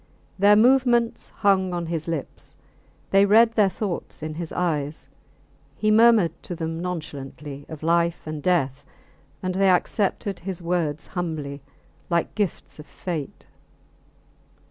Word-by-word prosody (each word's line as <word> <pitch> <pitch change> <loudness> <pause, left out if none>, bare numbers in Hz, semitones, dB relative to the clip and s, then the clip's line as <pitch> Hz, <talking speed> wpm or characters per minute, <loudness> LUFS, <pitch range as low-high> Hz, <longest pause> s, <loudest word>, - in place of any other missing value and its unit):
Their 205 +2 +6
movements 240 0 +3
hung 190 -2 +1
on 170 -1 -2
his 165 -1 -3
lips; 165 -5 -5 0.5
they 195 0 +6
read 225 +3 +5
their 210 -3 +4
thoughts 185 -5 -5
in 155 0 -4
his 165 +1 -5
eyes; 155 -4 -2 0.7
he 215 0 +2
murmured 220 -5 +6
to 175 - -6
them 165 0 -4
nonchalantly 145 -5 -6
of 155 -1 -8
life 170 +1 +1
and 155 -1 -5
death, 145 -6 +1 0.6
and 185 0 -1
they 195 +1 +3
accepted 195 +1 0
his 185 0 -4
words 170 -3 -1
humbly, 155 -6 -4 0.5
like 170 -1 0
gifts 205 -6 -3
of 150 - -11
fate. 165 -6 -6
175 Hz, 130 wpm, -24 LUFS, 155-195 Hz, 0.7 s, Their